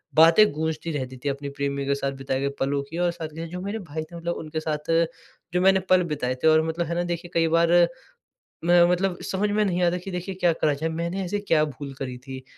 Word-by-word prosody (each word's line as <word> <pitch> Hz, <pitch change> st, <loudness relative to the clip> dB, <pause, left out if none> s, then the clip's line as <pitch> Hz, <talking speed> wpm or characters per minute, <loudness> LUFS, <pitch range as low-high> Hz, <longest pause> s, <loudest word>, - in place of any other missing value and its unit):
बातें 165 Hz, +7 st, +7 dB
गूँजती 160 Hz, +1 st, -2 dB
रहती 130 Hz, -3 st, -4 dB
थी 145 Hz, -, 0 dB
अपनी 140 Hz, +1 st, -4 dB
प्रेमी 140 Hz, 0 st, -2 dB
के 140 Hz, 0 st, +1 dB
साथ 140 Hz, 0 st, -2 dB
बिताए 130 Hz, 0 st, -1 dB
गए 140 Hz, -, 0 dB
पलों 140 Hz, +1 st, 0 dB
की। 165 Hz, -, -6 dB
और 175 Hz, 0 st, +2 dB
साथ 165 Hz, -2 st, -6 dB
के 165 Hz, +1 st, -5 dB
जो 180 Hz, +2 st, -6 dB
मेरे 200 Hz, +4 st, -3 dB
भाई 160 Hz, -4 st, -5 dB
थे 170 Hz, +2 st, -13 dB
मतलब 170 Hz, 0 st, -3 dB
उनके 155 Hz, 0 st, -4 dB
साथ 155 Hz, 0 st, -3 dB, 0.6 s
जो 180 Hz, -, +2 dB
मैंने 190 Hz, +1 st, +5 dB
पल 185 Hz, -1 st, +5 dB
बिताए 130 Hz, -3 st, -1 dB
थे -, -, +5 dB
और 155 Hz, 0 st, +6 dB
मतलब 165 Hz, +1 st, -1 dB
है 170 Hz, -, -2 dB
ना, 175 Hz, -, 0 dB
देखिए 175 Hz, 0 st, -4 dB
कई 165 Hz, -1 st, +3 dB
बार 165 Hz, +1 st, +3 dB, 0.9 s
मैं 175 Hz, 0 st, +6 dB
मतलब 180 Hz, 0 st, 0 dB
समझ 200 Hz, +2 st, 0 dB
में 210 Hz, +1 st, +2 dB
नहीं 180 Hz, -2 st, 0 dB
आता 175 Hz, 0 st, +2 dB
कि 180 Hz, +2 st, -8 dB
देखिए 180 Hz, +1 st, -4 dB
क्या 175 Hz, -2 st, +2 dB
करा 150 Hz, -2 st, +1 dB
जाए? 155 Hz, +3 st, -2 dB
मैंने 170 Hz, +4 st, -3 dB
ऐसे 205 Hz, +3 st, -2 dB
क्या 165 Hz, -6 st, +3 dB
भूल 140 Hz, -1 st, -7 dB
करी 130 Hz, -2 st, -4 dB
थी 130 Hz, -1 st, -7 dB
165 Hz, 245 wpm, -25 LUFS, 145-180 Hz, 0.9 s, बातें